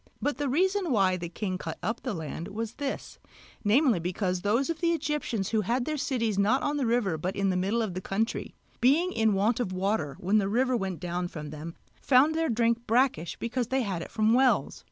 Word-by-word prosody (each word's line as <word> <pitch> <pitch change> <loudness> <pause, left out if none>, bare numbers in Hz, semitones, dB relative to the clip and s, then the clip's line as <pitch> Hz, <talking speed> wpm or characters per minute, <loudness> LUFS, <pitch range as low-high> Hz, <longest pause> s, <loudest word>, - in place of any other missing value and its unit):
But 290 -2 -2
the 290 -2 0
reason 375 +4 +1
why 195 -5 +3
the 170 -2 -5
king 185 0 -3
cut - - -5
up 225 +1 -2
the 250 -6 -3
land 160 +1 -5
was 220 +2 -4
this, 280 -2 -5 0.4
namely 235 - +4
because 180 +1 -2
those 225 +7 +1
of 330 -1 -3
the 340 -1 +3
Egyptians 295 - -2
who 220 -2 +1
had 240 +5 0
their 310 - -1
cities 230 -8 -1
not 220 +7 +3
on 290 0 0
the 270 -4 0
river 220 -9 +1
but 185 +5 -3
in 195 -1 +1
the - - -1
middle 200 +6 +1
of 205 -5 -3
the 185 - -4
country, 215 +5 -2 0.2
being 315 +9 +3
in 220 -2 +2
want 215 +5 +2
of 235 -7 -1
water 185 -6 -1
when 200 +4 +2
the 195 -1 0
river 255 +4 +2
went 190 -6 -2
down 175 0 -2
from 150 -4 -7
them, 155 +2 -7 0.3
found 275 +4 +5
their 325 0 0
drink 235 0 +1
brackish 230 - +1
because 240 0 -2
they 260 +1 0
had 190 -6 -3
it - - -7
from 220 0 +2
wells. 260 +1 +2
220 Hz, 220 wpm, -28 LUFS, 185-260 Hz, 0.4 s, found